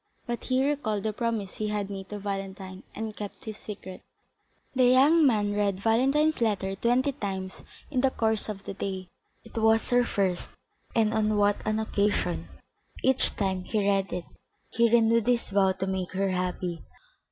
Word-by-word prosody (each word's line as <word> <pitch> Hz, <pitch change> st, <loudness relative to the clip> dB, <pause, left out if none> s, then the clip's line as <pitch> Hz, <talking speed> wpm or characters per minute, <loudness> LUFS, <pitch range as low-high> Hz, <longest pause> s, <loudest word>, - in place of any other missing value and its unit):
But 240 Hz, 0 st, -4 dB
he 260 Hz, +1 st, +2 dB
recalled 230 Hz, -9 st, -1 dB
the 215 Hz, -1 st, -1 dB
promise 225 Hz, -4 st, -2 dB
he 215 Hz, -, -1 dB
had 205 Hz, -1 st, -2 dB
made 195 Hz, -1 st, -7 dB
to 210 Hz, -, -5 dB
Valentine, 195 Hz, -1 st, -5 dB
and 220 Hz, 0 st, -4 dB
kept 205 Hz, -1 st, -8 dB
his 215 Hz, -1 st, -6 dB
secret. 195 Hz, -3 st, -8 dB, 0.7 s
The 255 Hz, -1 st, +4 dB
young 280 Hz, +5 st, +6 dB
man 205 Hz, -4 st, +2 dB
read 200 Hz, -2 st, 0 dB
Valentine's 270 Hz, +8 st, +2 dB
letter 200 Hz, -4 st, +1 dB
twenty 245 Hz, +7 st, +2 dB
times 190 Hz, -7 st, -5 dB, 0.3 s
in 255 Hz, -3 st, +1 dB
the 270 Hz, -, +4 dB
course 220 Hz, -3 st, 0 dB
of 200 Hz, -2 st, -5 dB
the -, -, -5 dB
day. 190 Hz, -2 st, -4 dB, 0.3 s
It 230 Hz, -, -16 dB
was 220 Hz, 0 st, +3 dB
her 245 Hz, 0 st, +4 dB
first, 190 Hz, -6 st, -1 dB, 0.5 s
and 220 Hz, -1 st, +3 dB
on 215 Hz, -1 st, +1 dB
what 205 Hz, 0 st, +3 dB
an 215 Hz, 0 st, +1 dB
occasion! 205 Hz, -4 st, 0 dB, 0.6 s
Each 265 Hz, 0 st, +2 dB
time 190 Hz, -2 st, -1 dB
he 210 Hz, -3 st, 0 dB
read 195 Hz, -1 st, +1 dB
it 180 Hz, -1 st, -4 dB, 0.5 s
he 235 Hz, 0 st, +3 dB
renewed 230 Hz, 0 st, +4 dB
his 240 Hz, -4 st, +1 dB
vow 195 Hz, -1 st, +3 dB
to 190 Hz, 0 st, -3 dB
make 190 Hz, -1 st, -3 dB
her 195 Hz, +1 st, 0 dB
happy. 180 Hz, -2 st, -2 dB
210 Hz, 175 wpm, -27 LUFS, 195-235 Hz, 0.7 s, young